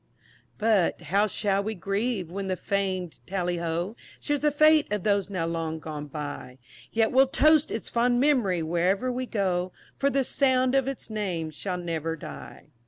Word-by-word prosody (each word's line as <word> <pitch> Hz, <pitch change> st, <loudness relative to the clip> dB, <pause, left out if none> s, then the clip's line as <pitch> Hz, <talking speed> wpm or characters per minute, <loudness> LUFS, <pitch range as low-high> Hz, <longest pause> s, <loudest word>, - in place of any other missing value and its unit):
But, 215 Hz, -5 st, +2 dB
how 205 Hz, +2 st, +4 dB
shall 200 Hz, -1 st, 0 dB
we 220 Hz, +1 st, -3 dB
grieve, 195 Hz, -1 st, -2 dB
when 195 Hz, +1 st, -4 dB
the 185 Hz, -, 0 dB
fam'd 190 Hz, -4 st, -2 dB
"Tally 180 Hz, -2 st, -1 dB
Ho," 170 Hz, +5 st, -2 dB, 0.2 s
Shares 290 Hz, 0 st, -1 dB
the 300 Hz, -, +3 dB
fate 305 Hz, -2 st, +4 dB
of 210 Hz, -3 st, -1 dB
those 200 Hz, -2 st, +1 dB
now 185 Hz, -4 st, -2 dB
long 165 Hz, -1 st, -2 dB
gone 150 Hz, -2 st, -6 dB
by? 145 Hz, -3 st, -6 dB, 0.3 s
Yet 225 Hz, 0 st, +2 dB
we'll 265 Hz, +1 st, +5 dB
toast 305 Hz, +3 st, +4 dB
its 225 Hz, -, -4 dB
fond 240 Hz, +1 st, +2 dB
mem'ry 240 Hz, -, +2 dB
wherever 180 Hz, +9 st, +1 dB
we 255 Hz, +1 st, -3 dB
go, 185 Hz, -4 st, 0 dB, 0.3 s
For 280 Hz, -, +3 dB
the 275 Hz, -1 st, +1 dB
sound 260 Hz, -1 st, +2 dB
of 270 Hz, -1 st, +2 dB
its 270 Hz, -4 st, -5 dB
name 180 Hz, -7 st, -2 dB
shall 180 Hz, +4 st, -4 dB
ne'er 165 Hz, -2 st, -3 dB
die. 165 Hz, -, -10 dB
200 Hz, 170 wpm, -27 LUFS, 175-250 Hz, 0.3 s, we'll